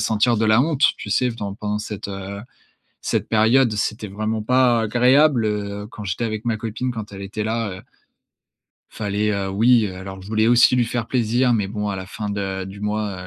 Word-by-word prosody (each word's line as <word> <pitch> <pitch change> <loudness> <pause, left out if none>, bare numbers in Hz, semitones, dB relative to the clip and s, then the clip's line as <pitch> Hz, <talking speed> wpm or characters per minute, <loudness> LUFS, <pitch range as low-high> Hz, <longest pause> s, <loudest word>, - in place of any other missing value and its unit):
sentir 110 +2 +2
de 110 - +1
la 110 +2 +5
honte, 150 -1 0 0.2
tu 105 - -7
sais? 125 +4 +2
Dans 100 -4 -5
pendant 105 0 -3
cette, 105 -1 -6
heu, 100 +1 -6 0.6
cette - - -1
période, 115 +3 +4
c'était 105 +1 -2
vraiment 110 +2 -2
pas 125 -1 +3
agréable, 125 +3 +4
heu, 105 -1 -3
quand 105 - -8
j'étais 95 +5 -2
avec 110 0 -4
ma 115 -2 +1
copine 115 +3 -3
quand 105 -2 -7
elle 95 - -8
était 105 +2 -4
là, 115 0 -1
heu - - -13 1.1
fallait, 105 0 -1
heu, 100 -1 -2
oui, 115 +3 +4
heu, 95 - -6
alors 95 0 -8
je - - -12
voulais 110 +1 +1
aussi 120 +1 +5
lui 120 -2 +2
faire 120 -1 -2
plaisir, 120 0 +1
mais 105 -4 0
bon 105 0 -3
à 95 - -3
la 95 0 -6
fin 105 +1 -5
de 95 -2 -3
du 100 +1 -10
mois, 105 -3 -3
110 Hz, 210 wpm, -21 LUFS, 100-115 Hz, 1.1 s, la